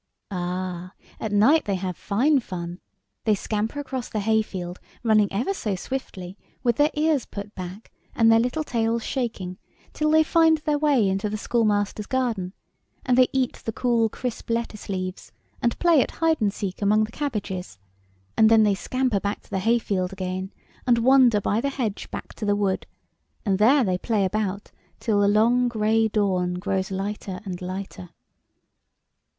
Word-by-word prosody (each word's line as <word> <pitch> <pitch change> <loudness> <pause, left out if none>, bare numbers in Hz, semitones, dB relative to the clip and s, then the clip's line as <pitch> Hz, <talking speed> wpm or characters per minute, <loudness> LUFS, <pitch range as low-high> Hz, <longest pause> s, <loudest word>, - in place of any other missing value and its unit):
" - - -55
Ah, 180 0 -4 0.3
at 220 - -3
night 250 +10 +4
they 200 - 0
have 185 -1 -3
fine 265 - +2
fun. 175 -5 -6 0.5
They 215 -2 +4
scamper 215 +7 -2
across 265 -4 -4
the 215 - -2
hayfield, 195 -5 -1 0.2
running 215 -3 +3
ever 240 - -1
so 215 - -2
swiftly, 185 -4 -6 0.2
with 240 -2 +2
their 295 +1 +4
ears 300 -3 +1
put 200 +1 -7
back, 185 +3 -8 0.2
and 225 -1 +5
their 225 - +6
little 250 +7 0
tails 230 -3 0
shaking, 205 -8 -3 0.3
till 305 0 0
they 315 +1 +5
find 320 0 +4
their 300 -1 -1
way 285 -8 +3
into 195 +2 -1
the 215 - -3
schoolmaster's 210 -2 0
garden, 230 -8 -1 0.5
and 250 - +3
they 255 0 +6
eat 260 -2 0
the 225 - -2
cool, 235 -1 +1
crisp 245 +1 -5
lettuce 230 -3 -3
leaves, 185 -1 -4 0.3
and 235 -1 +1
play 335 -5 +4
at - - -1
hide 325 -4 0
and 205 -2 +2
seek 195 -1 -5
among 210 +2 +3
the 215 - -4
cabbages, 200 - -4 0.6
and 220 0 +6
then 225 -1 +6
they 205 -1 +3
scamper 255 +2 0
to 200 +1 -4
the 195 - 0
hayfield 200 -4 +1
again, 185 0 -4 0.4
and 240 -1 +5
wander 245 -2 +5
by 205 +2 0
the 280 - 0
hedge 235 -7 -3
back - - -7
to - - -9
the 205 -1 +2
wood, 200 -2 -1 0.6
and 195 -2 +1
there 260 +6 +5
they 185 -4 0
play 215 -3 +1
about 200 0 -2 0.3
till 215 -3 +1
the 200 - +4
long 235 +4 +4
gray 220 -1 +2
dawn 185 -4 0
grows 190 0 -2
lighter 195 -1 -4
and 185 -2 -5
lighter." 185 - -6
215 Hz, 170 wpm, -24 LUFS, 195-245 Hz, 0.6 s, their